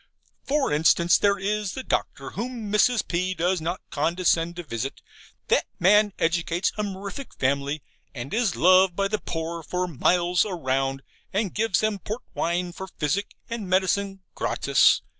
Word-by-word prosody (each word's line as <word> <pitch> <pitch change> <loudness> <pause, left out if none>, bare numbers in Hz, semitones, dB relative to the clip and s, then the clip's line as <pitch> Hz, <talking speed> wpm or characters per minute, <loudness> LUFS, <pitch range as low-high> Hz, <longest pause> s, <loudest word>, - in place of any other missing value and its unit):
For 280 - +1
instance, 165 +3 +4
there 200 0 +3
is 205 0 -2
the 265 - -5
doctor, - - -2
whom 235 -3 -5
Mrs. 230 +2 +3
P. 185 +2 -1
does 180 +1 0
not 170 +3 -3
condescend 170 +1 +1
to 175 - -6
visit: 135 -2 -4 0.5
that - - +3
man 210 +3 +5
educates 170 +1 0
a 210 - -2
mirific 200 +6 -6
family, 140 +2 0 0.3
and 130 +2 -6
is 225 -4 +1
loved 185 0 +5
by 195 +1 +1
the 215 +1 -1
poor 165 0 -4
for 180 +3 -2
miles 175 +3 +2
round: 135 -7 -1 0.3
and 200 -1 -1
gives 220 -3 +1
them 215 -2 0
port 215 +5 -5
wine 175 +1 -1
for 190 +2 -7
physic 170 +3 -2
and 230 -5 -5
medicine, 195 +1 +1
gratis. - - +3
180 Hz, 155 wpm, -25 LUFS, 165-205 Hz, 0.5 s, man